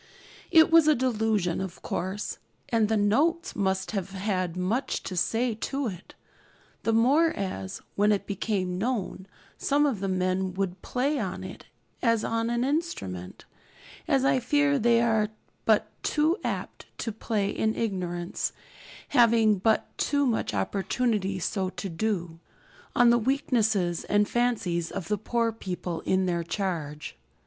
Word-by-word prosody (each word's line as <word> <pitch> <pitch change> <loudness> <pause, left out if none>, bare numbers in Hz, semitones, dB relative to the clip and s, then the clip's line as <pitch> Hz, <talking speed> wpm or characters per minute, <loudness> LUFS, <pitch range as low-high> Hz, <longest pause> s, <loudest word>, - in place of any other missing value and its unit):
It 320 0 +6
was 330 -2 +7
a 305 - +6
'delusion,' 220 -8 0
of 190 -2 -7
course, 190 +3 -3 0.3
and 225 -3 +2
the 220 - +2
'notes' 290 +12 +1
must 190 -1 0
have 195 -2 -3
had 185 -3 -2
much 205 +9 -1
to 185 - -5
say 225 +7 +1
to 270 +6 -3
it; 180 -2 -11 0.7
the 225 - +1
more 270 +9 +4
as, 140 - -5
when 205 +1 +3
it 205 - 0
became 190 -3 -2
known, 205 -4 -2 0.3
some 290 +1 +2
of 265 -9 0
the 195 - -2
men 185 0 0
would 190 -1 -2
play 275 +4 0
on 190 -4 -3
it - - -9 0.3
as 230 -2 +2
on 230 0 0
an 240 0 0
instrument, 255 - -3 0.6
as 270 0 +2
I 265 - +4
fear 290 +3 +2
they 235 0 +4
are 220 -2 +2 0.4
but - - +3
too 310 +3 +2
apt - - -4
to 225 - -3
play 210 -2 -1
in 220 0 0
ignorance, 180 -5 -2 0.6
having 225 -4 +4
but 220 +3 +1
too 285 -1 +2
much 230 - 0
opportunity 195 - 0
so 185 +1 -1
to 195 +1 -6
do, 170 -2 -2 0.6
on 240 -1 +6
the 235 - +4
weaknesses 220 - +1
and 205 0 +2
fancies 200 -9 0
of 180 -4 -6
the 210 - +1
poor 230 +2 0
people 180 -5 -5
in 190 0 +2
their 170 -2 0
charge. 165 - -4
210 Hz, 150 wpm, -27 LUFS, 185-240 Hz, 0.7 s, was